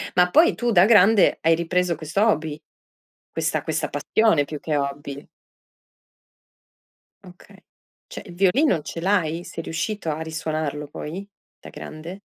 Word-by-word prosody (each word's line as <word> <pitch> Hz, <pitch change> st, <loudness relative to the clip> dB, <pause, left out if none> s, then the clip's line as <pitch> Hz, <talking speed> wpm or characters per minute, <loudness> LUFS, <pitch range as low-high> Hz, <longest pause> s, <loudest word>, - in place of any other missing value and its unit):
Ma 180 Hz, 0 st, +4 dB
poi 330 Hz, +2 st, +5 dB
tu 240 Hz, -1 st, -1 dB
da 180 Hz, -1 st, +6 dB
grande 210 Hz, -1 st, +5 dB
hai 165 Hz, 0 st, +4 dB
ripreso 175 Hz, 0 st, 0 dB
questo 160 Hz, +6 st, -3 dB
hobby? 155 Hz, -7 st, -1 dB, 0.7 s
Questa -, -, -1 dB
questa -, -, -2 dB
passione 215 Hz, -10 st, +2 dB
più 150 Hz, 0 st, -7 dB
che 150 Hz, -1 st, -2 dB
hobby? 140 Hz, 0 st, -4 dB, 2.0 s
Okay, 180 Hz, -1 st, -16 dB, 0.5 s
cioè -, -, -8 dB
il 175 Hz, -, -10 dB
violino 190 Hz, -, +2 dB
ce 165 Hz, -, -7 dB
l'hai? 175 Hz, -3 st, 0 dB
Sei 165 Hz, -, -7 dB
riuscito 165 Hz, +2 st, -4 dB
a 155 Hz, +1 st, -3 dB
risuonarlo 155 Hz, -2 st, -4 dB
poi, 175 Hz, +7 st, -7 dB, 0.3 s
da -, -, -12 dB
grande? 165 Hz, +5 st, -9 dB
165 Hz, 135 wpm, -23 LUFS, 155-195 Hz, 2.0 s, da